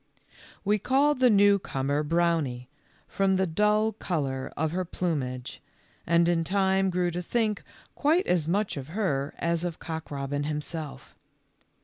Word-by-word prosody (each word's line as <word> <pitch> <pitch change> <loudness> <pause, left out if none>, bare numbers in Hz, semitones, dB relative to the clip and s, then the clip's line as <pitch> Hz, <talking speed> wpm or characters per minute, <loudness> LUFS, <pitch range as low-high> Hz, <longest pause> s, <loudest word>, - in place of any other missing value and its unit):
We 210 +1 +2
called 275 +5 +2
the 255 -1 +5
new 200 -1 +5
comer 140 -3 -1
Brownie, 155 -6 0 0.4
from 195 -1 +1
the 190 0 +2
dull 210 +5 +2
color 140 -10 -3
of 155 +1 0
her 185 +2 -1
plumage, 140 -8 -3 0.5
and 170 +1 +4
in 170 -1 +2
time 190 +1 +2
grew 180 -1 0
to 175 +1 -3
think 215 +2 0 0.3
quite 320 +6 +2
as 170 -4 +1
much 195 0 0
of 135 -1 -6
her 140 -10 -1
as 170 0 0
of 175 -2 -3
Cock 160 -1 -6
robin 145 0 -3
himself. 150 0 -5
170 Hz, 145 wpm, -27 LUFS, 150-200 Hz, 0.5 s, the